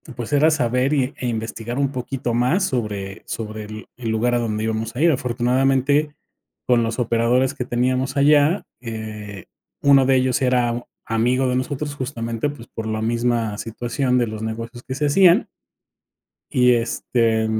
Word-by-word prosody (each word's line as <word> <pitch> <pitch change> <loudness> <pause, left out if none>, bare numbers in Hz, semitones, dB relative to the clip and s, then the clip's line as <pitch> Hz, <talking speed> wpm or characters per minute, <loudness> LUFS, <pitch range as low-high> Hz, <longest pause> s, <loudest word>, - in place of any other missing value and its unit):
pues, 120 +3 -5
era 155 +3 +5
saber 130 0 +1
y 135 0 +1
e 125 - -3
investigar 115 +2 -4
un 140 -1 +1
poquito 125 -2 -3
más 130 +11 +2
sobre 105 - -3
sobre 110 -1 -5
el 110 +1 -9
el 115 -3 -4
lugar 120 +2 +1
a - - +2
donde 110 -1 -2
íbamos 110 +1 -3
a 140 - -2
ir. 170 - +5
Afortunadamente, 135 +3 +1 0.5
con 120 -2 +4
los 115 +2 -2
operadores 120 +3 +2
que 125 - -3
teníamos 130 +3 0
allá, 150 +5 +4 0.2
eh, 110 -3 -7 0.4
uno 140 -2 +6
de 135 0 +4
ellos 130 0 +1
era 125 -2 +2
u 120 +1 -5 0.2
amigo 125 +4 +1
de 125 - 0
nosotros 145 +3 -3
justamente, 120 -1 -3
pues, 120 -5 -10
por 110 - -6
la 110 0 -2
misma 115 -1 0
situación 120 +3 -1
de 120 - +1
los 110 0 -6
negocios 115 +2 -6
que 130 - -5
se 150 +1 0
hacían. 180 - +5 1.1
Y 125 -2 +4
este, 115 -1 0
125 Hz, 165 wpm, -21 LUFS, 115-135 Hz, 1.1 s, uno